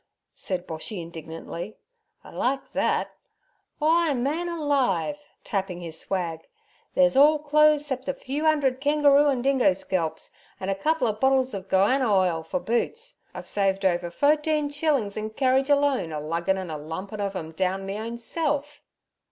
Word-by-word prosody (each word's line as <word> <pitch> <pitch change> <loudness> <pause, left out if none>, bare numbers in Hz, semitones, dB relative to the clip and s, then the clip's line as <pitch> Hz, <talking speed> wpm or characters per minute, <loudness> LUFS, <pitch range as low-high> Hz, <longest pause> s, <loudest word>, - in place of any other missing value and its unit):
said 185 -2 -3
Boshy 165 +5 -6
indignantly. 165 +3 -7 0.5
'I - - -13
like 270 +2 -1
thet. - - 0 0.7
W'y, 320 -2 +3
man 305 +8 -1
alive'—tapping 280 - -2
his 165 -2 -5
swag—' 170 -4 -3 0.5
thet's 270 -1 +4
orl 295 +3 +6
clo'es 300 0 +4
'cep 265 -2 -3
a 275 - 0
few 290 +4 -2
'undred 275 -4 +2
kengeroo 290 0 +4
an' 255 -3 0
dingo 265 -8 +3
scalps, 165 -4 -3 0.3
an'a 195 +1 -1
couple 260 +7 0
o' 215 - +1
bottles 260 +3 +2
ov 195 -1 -6
goanna 220 +6 +3
ile 185 -4 +2
fer 220 - -3
boots. 455 - -2 0.2
I've - - -8
saved 195 -1 0
over 175 -1 +1
fo'teen 300 - +1
shillin' 290 -8 0
in 215 0 -3
kerridge 265 +4 +1
alone, 280 - +2
a 155 - -3
luggin' 170 +5 -1
an' 185 -3 -5
a 155 - -4
lumpin' 185 +7 -6
ov' 200 -1 -2
em 160 -3 -5
down 190 +3 -1
me 195 +2 -4
own 230 +2 -5
self.' 290 +3 -2
240 Hz, 155 wpm, -25 LUFS, 185-290 Hz, 0.7 s, orl